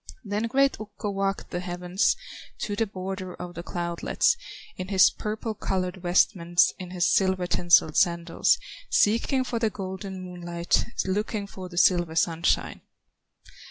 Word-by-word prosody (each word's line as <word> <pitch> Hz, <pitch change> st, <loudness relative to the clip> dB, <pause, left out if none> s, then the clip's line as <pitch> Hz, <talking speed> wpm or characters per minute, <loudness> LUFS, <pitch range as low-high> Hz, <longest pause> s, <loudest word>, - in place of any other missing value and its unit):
Then 210 Hz, +3 st, -1 dB
great 275 Hz, +3 st, +2 dB
Ukko 210 Hz, -1 st, -5 dB
walked 195 Hz, 0 st, -2 dB
the 175 Hz, -, -2 dB
heavens, 180 Hz, +1 st, 0 dB, 0.5 s
To 205 Hz, -, -2 dB
the 225 Hz, +1 st, 0 dB
border 190 Hz, -1 st, -6 dB
of 175 Hz, 0 st, -8 dB
the 170 Hz, -, -6 dB
cloudlets, 170 Hz, -, 0 dB, 0.4 s
In 185 Hz, -, -5 dB
his 190 Hz, -2 st, +5 dB
purple 215 Hz, +1 st, -4 dB
colored 185 Hz, -2 st, -2 dB
vestments, 175 Hz, -1 st, +3 dB
In 185 Hz, -1 st, -7 dB
his 180 Hz, -1 st, +1 dB
silver 190 Hz, -2 st, +2 dB
tinselled 175 Hz, -3 st, +4 dB
sandals, 170 Hz, -2 st, +3 dB, 0.3 s
Seeking 260 Hz, -, +2 dB
for 240 Hz, -2 st, -3 dB
the 225 Hz, -1 st, +2 dB
golden 190 Hz, -1 st, -6 dB
moonlight, 175 Hz, -1 st, -1 dB, 0.2 s
Looking 205 Hz, +2 st, -1 dB
for 190 Hz, -2 st, -9 dB
the 175 Hz, -, -10 dB
silver 175 Hz, -3 st, +3 dB
sunshine. 165 Hz, 0 st, +1 dB
185 Hz, 140 wpm, -26 LUFS, 175-205 Hz, 0.5 s, his